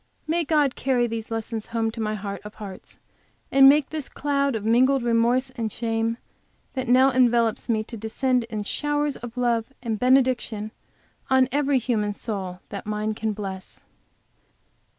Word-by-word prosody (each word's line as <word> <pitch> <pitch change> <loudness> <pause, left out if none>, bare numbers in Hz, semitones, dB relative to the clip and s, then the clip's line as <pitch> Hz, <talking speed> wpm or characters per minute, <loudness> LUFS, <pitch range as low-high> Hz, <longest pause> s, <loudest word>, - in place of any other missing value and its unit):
May 335 +2 0
God 295 -4 +2
carry 250 -2 +1
the 230 -1 -3
lessons 225 -1 -4
home 225 -1 -1
to 225 - -6
my 215 0 -1
heart 200 -1 -5
of 210 0 -10
hearts, 200 -3 -10 0.5
and 270 0 +8
make 290 0 +4
the 310 -1 -2
cloud 280 -2 0
of 215 -1 -4
mingled 255 +3 +3
remorse 240 +3 +2
and 230 -4 -3
shame 225 0 -1 0.6
which 260 -2 -3
now 260 +2 +5
envelops 240 -3 +2
me 220 -2 +1
to 230 +1 -9
descend 245 +3 0
in 215 -2 -4
showers 295 +4 -1
of 240 +1 -9
love 235 -2 +1 0.2
and 225 -3 -2
benediction 250 -4 +2 0.6
on 260 -1 +4
every 285 0 +2
human 220 -4 0
soul 190 -4 -5
that 200 0 -7
mine 215 0 -1
can 220 0 -2
bless! 195 -2 -7
235 Hz, 160 wpm, -24 LUFS, 215-260 Hz, 0.6 s, and